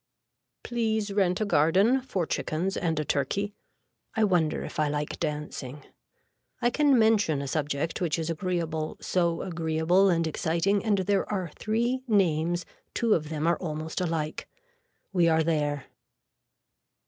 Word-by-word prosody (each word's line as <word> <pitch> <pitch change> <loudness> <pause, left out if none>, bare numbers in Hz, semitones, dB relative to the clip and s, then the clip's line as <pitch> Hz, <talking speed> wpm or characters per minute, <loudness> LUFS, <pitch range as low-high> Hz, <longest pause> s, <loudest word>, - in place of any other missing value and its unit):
Please 220 -3 -1
rent 185 -3 +2
a - - +2
garden 195 - +3
for 195 -9 -2
chickens 175 +5 -2
and 165 -3 0
a 150 - -1
turkey. 200 +11 -1 0.6
I 220 - +2
wonder 175 -6 +2
if - - -6
I 155 - +3
like 145 0 -3
dancing. 150 -2 -4 0.8
I 240 0 +2
can 285 -1 +4
mention 215 -9 +3
a 140 - -4
subject 150 +3 -2
which 170 -3 0
is 160 -1 -2
agreeable 165 -2 -2
so 170 -2 0
agreeable 170 +2 +2
and 165 -2 +2
exciting 170 +5 0
and 210 -3 +2
there 195 +1 0
are 185 -5 -2
three 235 +4 0
names 175 -5 +2 0.3
two 230 -3 +3
of 155 -2 0
them 155 -1 -2
are 170 0 +3
almost 155 -1 -4
alike. 160 -3 -2 0.6
We 175 -3 +4
are 160 0 +3
there. 150 -3 0
170 Hz, 145 wpm, -27 LUFS, 155-200 Hz, 0.8 s, can